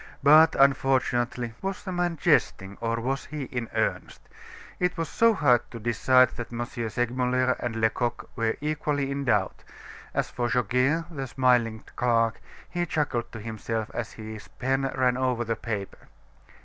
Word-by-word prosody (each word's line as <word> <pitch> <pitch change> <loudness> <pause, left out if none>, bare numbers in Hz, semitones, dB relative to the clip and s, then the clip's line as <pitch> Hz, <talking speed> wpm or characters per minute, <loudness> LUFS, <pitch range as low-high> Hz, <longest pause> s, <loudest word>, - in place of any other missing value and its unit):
But 155 +3 +7
unfortunately 130 -3 +2
" - - -28
Was 195 0 -4
the 190 - -5
man 175 -2 -1
jesting, 95 -7 +1
or 115 0 -1
was 135 +3 -2
he 150 -1 -5
in 120 -3 -4
earnest? - - -2 0.5
It 180 0 0
was 165 -1 -1
so 230 +7 +3
hard 125 - +4
to 115 - -8
decide, 130 +3 +4
that 120 -1 -6
M. 120 0 -3
Segmuller 125 +2 0
and 120 -2 -3
Lecoq 115 +2 -1
were 115 -2 0
equally 150 -2 -1
in 140 0 -3
doubt. 105 -6 0 0.5
As - - -1
for 120 0 -1
Goguet, 125 +7 +1
the 135 -4 -4
smiling 120 -4 +2
clerk, 115 -2 +1 0.3
he 175 -1 -2
chuckled 130 -7 -1
to 110 - -7
himself 110 0 -4
as 120 -2 -4
his 110 -1 -9
pen 135 +1 -1
ran 125 -1 +2
over 125 -2 0
the 115 0 -1
paper. 105 -5 -5
125 Hz, 160 wpm, -26 LUFS, 115-140 Hz, 0.5 s, But